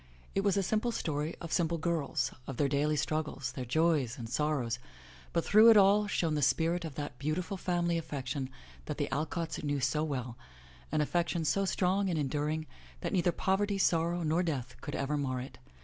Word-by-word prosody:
It 195 - +1
was 200 0 +2
a 195 - +2
simple 220 +5 0
story 155 -6 -2
of 170 - -7
simple 170 -1 +1
girls, 160 -3 -1 0.2
of 135 - -5
their 145 - +3
daily 145 +2 +1
struggles, 150 -3 -2
their 130 -1 -5
joys 150 -2 +2
and 115 -3 -6
sorrows, 125 -2 0 0.5
but 170 - 0
through 215 +2 +7
it 225 - +8
all 205 +1 +5
shone 165 -6 0
the 150 - 0
spirit 165 +5 +2
of 160 -5 -6
that 145 -4 -5
beautiful 160 +7 -2
family 175 -2 0
affection 135 -3 -4 0.4
that - - -4
the - - -1
Alcotts 160 +2 -2
knew 145 -1 0
so 135 +4 +1
well, 130 -6 -4 0.5
an 155 - +2
affection 170 +1 0
so 195 +5 +2
strong 190 +1 +1
and 170 - 0
enduring 150 +2 -1 0.4
that - - -3
neither 175 -1 +3
pov 190 +2 +1
erty, 205 -1 0
sorrow, 170 -1 +2
nor 160 +3 +2
death 135 -8 -3
could 145 - -5
ever 140 +2 -1
mar 130 -3 -1
it. 130 +2 -8
155 Hz, 195 wpm, -31 LUFS, 140-175 Hz, 0.5 s, it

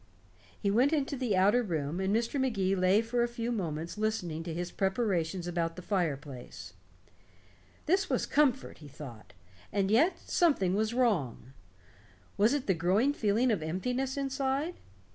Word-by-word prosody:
He 200 - 0
went 255 +8 +3
into 285 -2 0
the 245 -7 0
outer 205 +6 +4
room, 165 -5 -2
and 190 0 0
Mr. 230 +5 0
Magee 195 -7 +1
lay 190 +4 +3
for 240 +1 -1
a 240 - +2
few 235 0 -4
moments 170 -3 -3
listening 185 -7 -1
to 165 0 -5
his 175 +2 -4
preparations 190 -4 -1
about 170 -1 -2
the 180 - -9
fireplace. 140 - -3 1.1
This 385 +5 +2
was - - 0
comfort, 275 -3 +1
he 150 - -11
thought. 135 -6 -11 0.4
And 195 0 0
yet, 305 - +4
something 280 - +1
was 220 +3 0
wrong. 165 - 0 0.8
Was 215 +7 +3
it 285 - -2
the 190 - +2
growing 190 - +2
feeling 230 0 +2
of 205 -7 0
emptiness 250 - -2
inside? 275 +3 -1
205 Hz, 155 wpm, -30 LUFS, 170-250 Hz, 1.1 s, outer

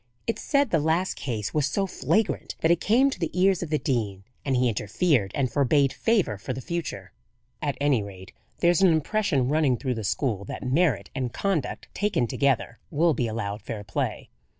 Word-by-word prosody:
It's 230 - -2
said 280 -4 +2
the 165 - +3
last 160 +5 +1
case 110 -6 -4
was 150 -2 +2
so 195 +7 0
flagrant 210 +3 -1
that 160 - +4
it 170 - +2
came 260 +6 +4
to - - -6
the 165 - -1
ears 190 -1 +4
of 175 - -4
the 155 - +2
dean, 105 -9 -2 0.2
and 135 -2 0
he 125 0 +3
interfered 115 - +1
and 130 -3 0
forbade 140 0 +3
favour 200 - +1
for 130 - -4
the 130 - -5
future. 170 +4 -5 0.5
At 145 -2 -2
any 140 -5 +2
rate, 95 -2 -9 0.3
there's 175 0 +4
an 190 -3 +6
impression 160 - +1
running 145 -3 +2
through 130 -1 -2
the 110 -2 -4
school 105 +1 -1
that - - -6
merit 130 - +1
and 125 -3 -2
conduct, 165 -9 -2
taken 205 -11 +1
together, 120 -1 0
will 165 +2 +3
be 120 -4 -1
allowed 110 -2 -3
fair 105 0 -6
play." 100 - -3
140 Hz, 195 wpm, -26 LUFS, 115-175 Hz, 0.5 s, an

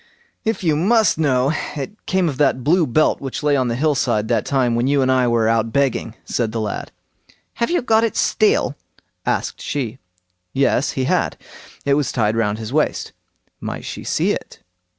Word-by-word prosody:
"If 220 -2 -1
you 160 -3 +2
must 205 +2 +3
know, 135 -2 +2 0.2
it 155 +9 -7
came 185 -2 +2
of 140 -5 -3
that 135 -3 +2
blue 165 +3 +3
belt 155 +6 +2
which 135 +1 -5
lay 145 -1 +3
on 130 -2 +1
the 115 - -1
hill 150 +4 +2
side 115 -5 0
that - - +1
time 130 -4 +2
when 120 +2 +1
you 140 -1 +3
and 130 - +2
I 130 -1 +3
were 115 -2 +2
out 115 0 +1
begging", 130 -3 0
said 115 -3 -1
the 115 - -3
lad. 105 -2 -4 0.7
"Have 235 - +2
you 350 -6 +1
got 225 -2 +3
it 230 - 0
still?" 430 +2 +2 0.5
asked - - -1
she. 130 -4 -3 0.5
"Yes"—he 135 0 +1
had. - - 0 0.5
It 140 - +3
was 140 -2 +1
tied 110 -3 +1
round 105 -2 0
his 110 +2 -6
waist. 155 0 0 0.5
"Might - - -5
she - - -6
see - - +1
it?" - - -6
135 Hz, 190 wpm, -20 LUFS, 120-155 Hz, 0.7 s, must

